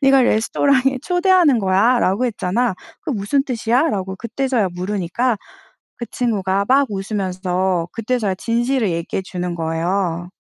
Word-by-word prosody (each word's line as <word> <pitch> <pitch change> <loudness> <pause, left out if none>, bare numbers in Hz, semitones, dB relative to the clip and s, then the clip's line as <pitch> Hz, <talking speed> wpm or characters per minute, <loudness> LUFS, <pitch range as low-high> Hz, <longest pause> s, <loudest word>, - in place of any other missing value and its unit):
네가 270 -1 +5
레스토랑에 260 +3 +2
'초대하는 355 -6 +3
거야.'라고 200 +3 +2
했잖아. 225 0 -1 0.3
그 - - -5
무슨 225 +5 0
뜻이야?"라고 230 - 0
그때서야 235 0 -1
물으니까 200 +5 -1 0.6
그 235 - -6
친구가 200 -5 0
막 275 +1 +4
웃으면서 190 -3 -1
그때서야 225 -3 -1
진실을 235 0 0
얘기해 170 +3 -3
주는 180 -2 -4
거예요. 170 +2 -2
210 Hz, 335 characters per minute, -19 LUFS, 185-255 Hz, 0.6 s, 네가